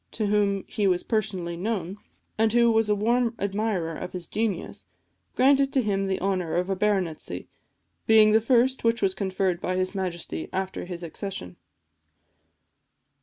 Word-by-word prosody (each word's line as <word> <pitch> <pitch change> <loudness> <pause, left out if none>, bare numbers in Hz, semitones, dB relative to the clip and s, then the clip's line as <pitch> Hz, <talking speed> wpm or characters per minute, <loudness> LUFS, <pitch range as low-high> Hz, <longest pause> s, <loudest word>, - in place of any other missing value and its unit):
to 220 - -2
whom 200 -1 +1
he 205 -2 0
was 180 -2 +1
personally 190 -6 -2
known, 190 -1 -3 0.4
and 220 0 +2
who 235 -1 +5
was 220 -1 +2
a 210 - +3
warm 230 +3 +1
admirer 200 -4 -1
of 180 - -7
his 180 -2 -5
genius, 210 -3 -3 0.5
granted 275 +1 +4
to 275 - +2
him 200 -4 0
the 190 - -1
honour 185 -3 -1
of 180 +2 0
a - - +1
baronetcy, 190 -5 -1 0.6
being 220 -1 +7
the 220 +1 +5
first 255 +3 +2
which 230 -1 +1
was 190 -1 +2
conferred 190 -2 -1
by 185 - -1
his 185 +1 -1
Majesty 170 - -4
after 190 0 -3
his 175 -1 -6
accession. 165 - -6
195 Hz, 160 wpm, -26 LUFS, 180-220 Hz, 0.6 s, being